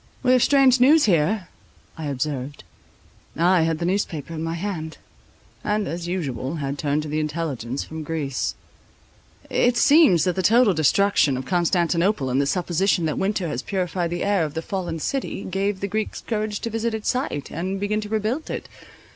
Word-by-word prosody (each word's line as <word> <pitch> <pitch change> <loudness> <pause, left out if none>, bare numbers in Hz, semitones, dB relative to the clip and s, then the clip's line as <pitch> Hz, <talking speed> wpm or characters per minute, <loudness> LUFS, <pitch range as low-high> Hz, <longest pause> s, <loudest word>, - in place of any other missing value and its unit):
"We 255 - +4
have 255 -1 +5
strange 270 -2 +5
news 290 +5 +6
here," 180 +1 +1 0.5
I 160 -2 -5
observed. 140 0 -3 0.7
I 175 +2 +4
had 165 0 +1
the 170 - -3
newspaper 170 -5 -2
in 160 - -5
my 165 +1 -2
hand, 170 -4 -4 0.7
and, 210 -1 0
as 170 +1 -4
usual, 145 -6 -3
had 140 -2 -4
turned 150 0 0
to - - -6
the 150 +1 -1
intelligence 145 -5 -3
from 160 0 -7
Greece. 150 -4 -2 0.9
"It 245 0 +2
seems 285 - +5
that 180 -2 0
the 190 - 0
total 225 +2 +5
destruction 155 -2 +3
of 130 - -5
Constantinople, 175 -3 +1
and 130 +2 +2
the 140 - 0
supposition 180 +1 +1
that 155 - -1
winter 195 -2 0
had 125 -5 -3
purified 180 -2 -1
the 175 - -3
air 200 -4 +2
of 150 -1 -4
the 160 - -3
fallen 175 -4 -3
city, 255 - -3
gave 195 +1 -2
the 200 - -1
Greeks 215 +2 -3
courage 215 -2 -3
to 230 - -3
visit 225 0 -1
its 220 - -2
site, 250 - -2
and 185 +4 -3
begin 210 +2 -1
to 210 - -7
rebuild 220 +8 -2
it. - - -5
175 Hz, 180 wpm, -23 LUFS, 155-210 Hz, 0.9 s, news